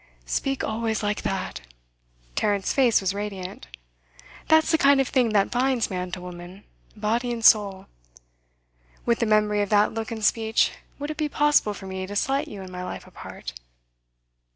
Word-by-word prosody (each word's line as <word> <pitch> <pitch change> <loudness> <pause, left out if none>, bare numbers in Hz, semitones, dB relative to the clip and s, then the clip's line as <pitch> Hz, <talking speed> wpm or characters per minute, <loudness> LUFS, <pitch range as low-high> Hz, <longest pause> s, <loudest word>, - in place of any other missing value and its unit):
'Speak 270 - -1
always 220 0 -1
like 205 0 -1
that!' 190 -1 -3 0.7
Tarrant's 200 - 0
face 250 -6 +4
was 190 0 0
radiant. 195 - -6 0.8
'That's 315 0 +4
the 320 - +3
kind 280 0 +5
of 270 - +2
thing 250 -3 +2
that 205 -2 +2
binds 250 -2 +1
man 180 -1 -3
to 185 - -3
woman, 180 +2 -10 0.3
body 225 +3 -1
and 230 -2 -3
soul. 200 -3 +5 1.2
With 235 -1 +2
the 230 - +1
memory 210 -1 +3
of 205 - -1
that 210 0 +3
look 225 0 -4
and 220 -2 -3
speech, 220 0 +2 0.3
would 290 +1 -4
it 305 - -7
be 305 -2 -1
possible 295 -8 +2
for 195 - -10
me 190 0 -5
to 205 - -7
slight 270 +7 0
you 200 -2 -8
in 185 - -10
my 180 0 -6
life 180 - -6
apart? 65 - -9
215 Hz, 175 wpm, -25 LUFS, 195-240 Hz, 1.2 s, kind